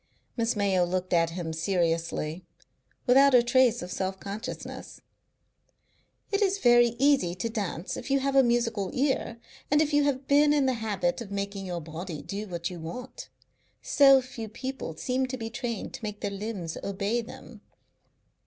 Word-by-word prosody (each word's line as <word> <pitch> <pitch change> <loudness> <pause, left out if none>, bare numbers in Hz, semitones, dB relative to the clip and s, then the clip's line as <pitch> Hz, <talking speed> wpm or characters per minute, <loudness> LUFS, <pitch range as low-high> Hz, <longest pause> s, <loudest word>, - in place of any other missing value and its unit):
Miss 230 -1 0
Mayo 195 -3 +2
looked 185 +1 -2
at 165 -1 +3
him 165 -1 -5
seriously, 165 -1 -1 0.6
without 270 +1 +6
a 240 - +6
trace 245 -2 +3
of 180 - -7
self 190 0 -3
consciousness. 200 +2 -7 1.3
"It 400 +1 +1
is 395 -1 +2
very 240 - +5
easy 265 -10 +3
to 205 +6 -3
dance 200 -5 -3
if - - -7
you 275 - +3
have 275 0 -1
a 270 - +8
musical 235 -5 +1
ear, 260 -3 0 0.3
and 295 - +4
if 305 -1 +1
you 290 0 +4
have 270 -1 -1
been 290 +1 +5
in 290 -2 +3
the 260 - +2
habit 200 -2 -1
of 220 - -7
making 200 -1 -4
your 175 -1 -4
body 160 -1 -7
do 205 +5 -5
what 170 -2 -4
you 175 - -7
want. 245 +11 -8 0.5
So 275 -2 +6
few 230 -3 -7
people 255 - -6
seem 255 +5 -1
to 260 0 -4
be 225 -2 -5
trained 235 -3 -4
to - - -9
make 210 -1 -5
their 200 - -2
limbs 200 -5 -5
obey 200 +4 -1
them. 230 - -12
220 Hz, 170 wpm, -27 LUFS, 185-260 Hz, 1.3 s, a